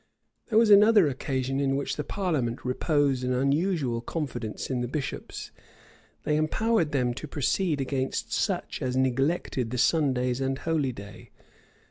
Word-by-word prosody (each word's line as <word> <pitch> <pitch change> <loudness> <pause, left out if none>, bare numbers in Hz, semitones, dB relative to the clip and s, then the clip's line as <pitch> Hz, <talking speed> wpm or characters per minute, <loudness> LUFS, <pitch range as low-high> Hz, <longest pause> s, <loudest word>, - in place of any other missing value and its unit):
[*] - - -49
There 220 - +2
was 225 -2 +5
another 205 -1 +7
occasion 135 0 -2
in 135 -1 +1
which 140 - -2
the 150 - -3
parliament 145 - -2
reposed 135 0 +1
an 125 0 0
unusual 140 -2 0
confidence 135 -5 -4
in 125 -2 -1
the 120 - -2
bishops. 140 +2 -5 0.7
They 150 - +1
empowered 170 +2 +1
them 125 -4 +1
to 155 - -7
proceed 150 +3 0
against 135 0 -2
such - - -1
as 130 0 -1
neglected 130 -1 0
the 125 - -3
Sundays 130 -4 +1
and 135 0 -1
holy 155 -4 0
day. 100 -3 -11
135 Hz, 150 wpm, -27 LUFS, 125-160 Hz, 0.7 s, another